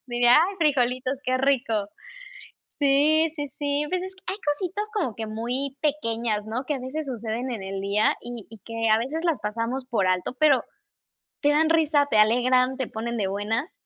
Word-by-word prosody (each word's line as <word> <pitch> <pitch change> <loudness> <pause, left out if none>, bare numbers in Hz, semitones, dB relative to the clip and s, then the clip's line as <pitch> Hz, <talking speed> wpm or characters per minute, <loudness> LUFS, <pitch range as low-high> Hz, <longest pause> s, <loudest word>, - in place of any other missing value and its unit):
Diría: 240 0 +5
"Ay 400 - -5
frijolitos, 255 -4 +1
qué 255 0 +1
rico" 245 -6 +1 0.9
sí, 295 +3 +4
sí, 290 -1 -3
sí, 290 0 0
pues 365 0 -1
es 375 0 -8
que 375 - -23
hay 380 +3 -2
cositas 370 +8 -1
como 305 - -1
que 220 +1 -4
muy 250 +5 -3
pequeñas, 230 -8 -1
¿no?, 230 +5 -4
que 295 - -1
a - - -5
veces 280 +4 -5
suceden 240 0 -4
en 220 -5 -5
el 195 0 -4
día, 200 +2 +2
y 240 -3 -7
y 225 - -12
que 230 0 -1
a - - +5
veces 285 +9 -3
las 330 -6 +1
pasamos 230 +5 -3
por 225 -7 0
alto, 185 +7 0
pero 290 -5 +4 0.8
te 290 - +3
dan 315 +2 +3
risa, 310 -3 +3
te 220 - +2
alegran, 250 +4 +3
te 260 -3 -2
ponen 235 +2 -4
de 200 -3 0
buenas, 210 - -2
255 Hz, 190 wpm, -25 LUFS, 225-295 Hz, 0.9 s, Diría